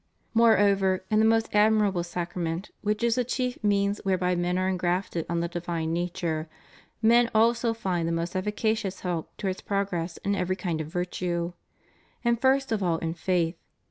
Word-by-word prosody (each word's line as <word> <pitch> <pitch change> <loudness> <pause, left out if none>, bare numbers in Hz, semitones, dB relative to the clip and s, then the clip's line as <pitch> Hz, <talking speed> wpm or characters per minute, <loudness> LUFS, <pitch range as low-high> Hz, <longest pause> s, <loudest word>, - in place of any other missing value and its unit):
^ - - -47 0.3
Moreover, 200 -5 +4
in 215 - +4
the 220 - +5
most 225 0 +3
admirable 210 -3 +3
Sacrament, 175 0 -4
which 210 +2 -1
is 235 -1 +3
the 250 - +1
chief 250 0 -2
means 200 0 +1
whereby 185 -2 +1
men 175 +1 0
are 185 0 +1
engrafted 180 -2 -1
on 170 0 0
the 170 - -1
di\dne 170 -1 -3
nature, 170 -2 -2 0.5
men 235 +1 +5
also 230 +1 +3
find 180 -6 -1
the - - 0
most 170 +2 -2
efficacious 210 0 -1
help 175 -3 -4
towards 190 -2 -3
progress 190 -4 -2
in 200 - +2
every 185 -1 0
kind 175 -4 -2
of 155 - -5
virtue. 175 0 -2 0.7
And 235 -1 +2
first 270 -1 +3
of 220 -2 0
all 170 -3 +1
in 165 0 -3
faith. 170 -1 0
185 Hz, 175 wpm, -27 LUFS, 175-215 Hz, 0.7 s, the